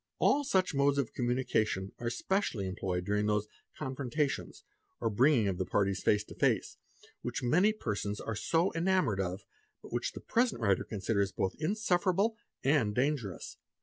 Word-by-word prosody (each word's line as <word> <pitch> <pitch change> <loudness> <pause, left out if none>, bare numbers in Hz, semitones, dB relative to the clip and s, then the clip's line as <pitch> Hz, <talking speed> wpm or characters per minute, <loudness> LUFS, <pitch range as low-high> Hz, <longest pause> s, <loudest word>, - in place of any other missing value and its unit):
All 290 - +3
such 190 - +1
modes 140 0 +3
of 135 -5 -1
communication 120 -6 0
are 120 - -1
specially 120 - -1
employed 90 -1 -2
during 105 +1 +1
those 105 0 +1 0.3
'confrontations,' 140 +1 -2 0.4
or 115 - 0
bringing 120 0 +4
of 95 -2 -2
the 95 - 0
parties 100 -1 +1
face 105 0 +3
to - - -12
face, - - +1 0.4
which 125 +2 -4
many 180 - +4
persons 105 - -3
are 115 - -4
so 165 - +1
enamoured 165 - +1
of, 95 +1 -3 0.4
but - - -11
which 120 0 -1
the - - -7
present 240 0 +1
writer 100 -5 +2
considers 100 -1 -1
both 95 -4 -1
insufferable 195 +3 +1 0.3
and 135 -7 +2
dangerous. 125 - -1
120 Hz, 155 wpm, -31 LUFS, 105-160 Hz, 0.4 s, bringing